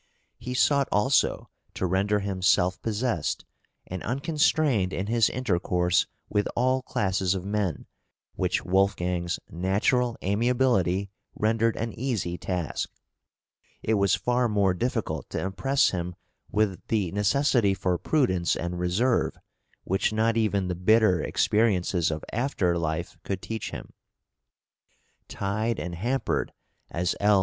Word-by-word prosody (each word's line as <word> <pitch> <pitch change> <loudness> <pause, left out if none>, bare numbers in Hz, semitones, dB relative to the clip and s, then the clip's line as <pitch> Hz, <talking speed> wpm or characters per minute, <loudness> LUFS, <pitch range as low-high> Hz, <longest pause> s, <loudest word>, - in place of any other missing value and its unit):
He 125 +2 -5
sought 140 +1 +3
also 105 +7 +2 0.3
to - - -1
render 100 +3 +1
him 100 -2 -3
self 90 0 +3
possessed 110 - -1 0.4
and 95 -1 -6
unconstrained 140 - +1
in 95 - -2
his 115 +1 +3
intercourse 90 -7 +1 0.2
with 105 0 0
all 130 +2 +2
classes 95 -8 0
of 95 -1 -4
men, 100 -5 -2 0.5
which - - -1
Wolfgang's 90 -2 +1
natural 105 - +1
amiability 100 -3 +1 0.2
rendered 115 +1 +1
an 115 -1 -3
easy 115 -9 -2
task; 90 -3 -3 0.9
it 110 - +1
was 100 -2 +3
far 125 -1 +1
more 100 -3 +2
difficult 120 +7 -2
to - - -3
impress 135 +9 +1
him 90 -1 -3 0.4
with 105 -3 +1
the 100 -6 0
necessity 105 0 +2
for 90 -2 0
prudence 95 - +1
and 85 +1 -4
reserve, 100 +8 +1 0.5
which 95 +3 0
not 110 +1 +1
even 105 -4 +1
the 90 - -1
bitter 100 +1 +3
experiences 95 -6 +1
of 80 -1 -4
after 110 -8 0
life 80 -2 -3
could 95 -2 -3
teach 110 +3 -5
him. - - -9 1.3
Tied 110 +3 -2
and 90 - -4
hampered, 120 +9 -1 0.4
as 85 +1 -1
L. 105 -1 +4
100 Hz, 125 wpm, -26 LUFS, 90-115 Hz, 1.3 s, L